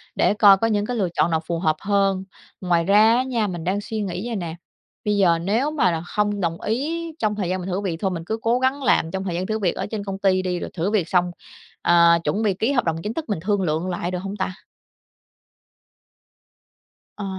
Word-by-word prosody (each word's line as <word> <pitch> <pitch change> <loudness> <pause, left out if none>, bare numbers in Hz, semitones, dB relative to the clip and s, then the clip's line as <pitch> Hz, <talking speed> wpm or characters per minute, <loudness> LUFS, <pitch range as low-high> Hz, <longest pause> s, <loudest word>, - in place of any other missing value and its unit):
Để - - +3
coi 205 -2 +7
có 225 - +1
những 205 -2 0
cái 245 - -3
lựa 190 -5 0
chọn 170 - +2
nào 160 - +2
phù 170 0 -2
hợp 155 -3 +1
hơn. 195 -1 +1 0.4
Ngoài 175 -2 +2
ra 210 +5 +5
á 255 - +2
nha, 235 -5 -1
mình 175 -4 -5
đang 190 +4 -1
suy 220 0 -4
nghĩ 195 +2 -4
vậy 235 - -3
nè, 170 -5 -4 0.5
bây 210 -1 +1
giờ 175 -4 +4
nếu 220 - 0
mà 280 - +2
là 165 -1 -2
không 205 +3 -1
đồng 170 -1 -2
ý 295 +10 -2 0.2
trong 210 -2 0
thời 195 -4 -2
gian 185 - -1
mình 180 +1 -5
thử 185 +2 -1
việc 180 -5 -2
thôi 190 -2 0
mình 165 -2 -4
cứ 220 +5 -2
cố 235 +2 +2
gắng 265 +2 0
làm 165 -9 +2
trong 190 0 -3
thời 180 -3 -3
gian 180 +2 -2
thử 215 +2 -2
việc 185 -5 0
ở - - -3
trên 210 -1 -5
công 195 -1 -4
ty 190 -1 +2
đi, 180 -1 -2
rồi - - -5
thử 180 +3 -1
việc 190 -7 0
xong, 180 -1 +2 0.5
ờ, 170 0 +5
chuẩn 200 +9 0
bị 205 -3 +2
ký 220 +8 0
hợp 245 -4 +2
đồng 165 -1 -1
chính 210 - -3
thức 315 +4 -5
mình 205 - -1
thương 205 +1 0
lượng 165 +1 -1
lại 175 0 -3
được 180 - -2
hông 195 +2 -5
ta? 190 0 -2 2.6
Ờ. 205 - -6
195 Hz, 245 wpm, -22 LUFS, 175-215 Hz, 2.6 s, coi